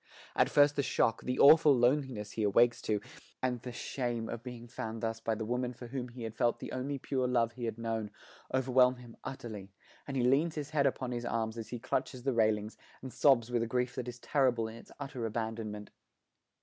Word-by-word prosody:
At - - +4
first 145 0 +5
the - - +4
shock, 115 -4 +1
the 125 0 -2
awful 150 0 +8
loneliness 120 -4 +1
he 110 - -4
awakes 115 +3 +4
to, 105 -1 0 0.4
and 125 -2 -1
the 125 - -6
shame 120 -2 -3
of 115 - -5
being 120 -1 -8
found 115 0 -6
thus 115 0 -1
by 115 0 -1
the 110 0 -4
woman 125 +2 -1
for 120 - -9
whom 125 -1 -4
he 120 0 -9
had 110 -1 -4
felt 120 +1 +1
the - - -7
only 135 +2 -3
pure 130 -1 -1
love 115 -2 +2
he 120 +1 -6
had 115 -1 -3
known, 115 -2 -2 0.4
overwhelm 130 -1 +4
him 120 -2 -13
utterly, 110 -7 -7 0.4
and 135 -1 -3
he 125 - +2
leans 145 +6 +3
his 150 -2 -5
head 140 -3 +3
upon 130 -1 -2
his 120 -1 -3
arms 115 -2 -1
as 115 -1 -6
he 120 - -4
clutches 130 +1 -2
the 135 -1 +1
railings, 110 -1 +1 0.3
and 130 - -7
sobs 125 -5 +4
with 120 -1 +1
a 115 - -1
grief 125 +1 0
that 125 -2 -5
is 125 0 -6
terrible 125 -3 +1
in 110 - -8
its - - -14
utter 135 -4 -5
abandonment. 110 -2 -4
120 Hz, 215 wpm, -32 LUFS, 115-130 Hz, 0.4 s, awful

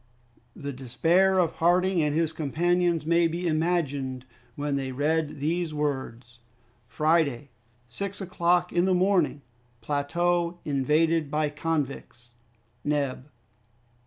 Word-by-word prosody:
The 140 0 -6
despair 165 +10 +2
of 175 -3 +1
Harding 180 +1 +3
and 150 -1 0
his 160 -1 +1
companions 170 +2 0
may 170 +1 +3
be 170 +2 -4
imagined 145 -6 -1 0.3
when 145 -1 -2
they 135 -1 -2
read 150 +2 -1
these 160 +2 -1
words: 130 -5 -4 0.5
"Friday, 150 -4 +1 0.4
six 200 +11 -5
o'clock 180 -2 +1
in 175 +1 +3
the 190 -1 +3
morning. 180 -6 +1 0.4
"Plateau 170 +5 0
invaded 150 +2 +1
by 150 0 0
convicts. 140 -6 -4 0.5
"Neb." 140 -2 -1
155 Hz, 110 wpm, -26 LUFS, 140-175 Hz, 0.5 s, Harding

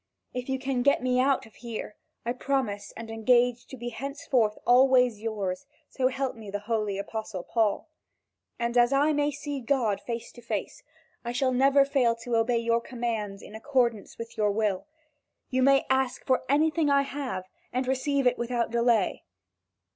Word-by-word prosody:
If 250 +1 -5
you 265 - 0
can 265 -1 -1
get 280 0 +3
me 250 0 +2
out 265 0 +2
of 220 - -17
here, 230 -3 -6 0.3
I 240 - 0
promise 250 -6 -2
and 225 0 -7
engage 240 +2 +2
to 265 - -9
be 240 0 -4
henceforth 260 -4 -1
always 250 -3 +5
yours, 205 0 -3 0.2
so 255 -1 +1
help 265 0 -2
me 220 -3 -10
the 205 +1 -4
holy 215 -3 -1
Apostle 200 -2 -5
Paul! 225 +4 0 0.7
And 235 +1 +1
as 240 +1 +4
I 290 +3 +3
may 290 0 +2
see 290 -1 -5
God 230 -5 0
face 235 -1 -5
to 240 - -14
face, 235 - -4 0.4
I 240 0 -3
shall 255 +1 +1
never 275 +2 +5
fail 260 -4 +2
to 235 0 -3
obey 230 +1 +2
your 230 0 +1
commands 225 -5 -4
in - - -12
accordance 235 -2 0
with 230 0 -8
your 210 -1 +2
will. 205 +1 -1 0.6
You 260 0 +1
may 275 +1 +5
ask 265 -1 0
for 260 - +1
anything 310 +2 +3
I 280 0 +4
have, 270 -9 -4 0.3
and 255 +1 -1
receive 270 +1 0
it 250 0 +3
without 235 -1 -1
delay." 235 -4 +2
245 Hz, 175 wpm, -27 LUFS, 225-265 Hz, 0.7 s, always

